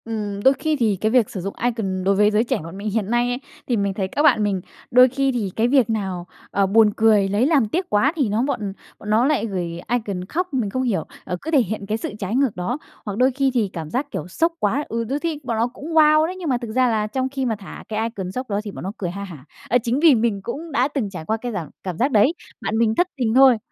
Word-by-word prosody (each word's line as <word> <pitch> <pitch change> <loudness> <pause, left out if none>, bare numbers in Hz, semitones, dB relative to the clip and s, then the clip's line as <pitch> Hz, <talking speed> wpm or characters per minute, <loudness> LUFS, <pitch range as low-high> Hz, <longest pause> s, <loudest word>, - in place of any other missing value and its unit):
Ừm, 205 -3 -4
đôi 265 - +6
khi 310 +3 -1
thì 220 -4 +2
cái 220 - +2
việc 245 -4 +3
sử 190 - -5
dụng 195 +2 -4
icon 210 -6 -1
đối 195 +1 +3
với 210 +1 +4
giới 215 +2 +3
trẻ 240 - -1
bọn 165 +3 -9
mình 205 +2 -3
hiện 210 -1 -1
nay 240 0 +2
ấy, 245 +1 -2 0.3
thì 240 - +1
mình 200 -1 0
thấy 190 -1 -2
các 285 +10 -1
bạn 215 -8 +5
mình 195 -3 0 0.3
đôi 250 +1 +7
khi 270 +1 0
thì 230 -6 -2
cái 225 +1 +2
việc 255 -3 +3
nào, 190 -5 -2 0.2
ờ, 200 - +2
buồn 215 +2 +5
cười, 215 -3 +4
lấy 205 +5 +2
làm 285 -8 +3
tiếc 355 - -2
quá 255 +9 +3
thì 275 -9 +1
nó 215 +4 +1
bọn 215 -8 -2 0.3
bọn 210 - -8
nó 220 +4 +4
lại 290 -4 +1
gửi 175 -5 -4
icon 210 -7 -2
khóc, 350 - -3
mình 240 -6 0
không 255 +6 -2
hiểu, 200 -10 0 0.2
ờ, 180 - -3
cứ 320 - -5
thể 295 - +5
hiện 215 -3 -4
cái 215 +2 -1
sự 220 - -5
trái 200 +3 -2
ngược 265 -4 +2
đó. 185 +9 -2 0.3
Hoặc 205 -2 -4
đôi 255 +2 +4
khi 270 +1 +1
thì 225 -6 +1
cảm 160 -2 -5
giác, 275 - -2
kiểu, 155 - -4
sốc 330 - 0
quá, 260 +8 0
ừ, 230 +1 -1
đôi 270 +6 -2
thi 320 -2 -2
bọn 235 -3 -2
nó 230 +2 +2
cũng 280 - -10
wow 310 0 +6
đấy, 360 +3 -4
nhưng 340 -4 -3
mà 255 - +2
thực 235 -2 -6
ra 255 +2 +3
là 215 -2 0
trong 260 +4 -2
khi 270 -1 -3
mà 230 -3 0
thả 200 -2 -10
cái 220 0 -1
icon 190 -5 -6
sốc 255 +4 -5
đó 200 0 0
thì 210 - -6
bọn - - -8
nó 190 - -3
cười 180 - -3
ha 200 +2 -6
hả. 160 -9 -10 0.2
Ờ, 245 - +5
chính 240 +3 0
vì 315 -3 +6
mình 220 -3 0
cũng 310 +9 -6
đã 260 -1 +2
từng 275 -8 -2
trải 175 -5 -8
qua 220 +4 0
cái 245 +2 -5
giảm 170 -8 -4
cảm 185 -3 -4
giác 265 +7 +1
đấy, 220 +7 +4 0.3
bạn 220 - -1
mình 225 -1 +2
thất 355 - +3
tình 235 -4 0
thôi 265 -2 +7
225 Hz, 285 wpm, -22 LUFS, 200-260 Hz, 0.3 s, đôi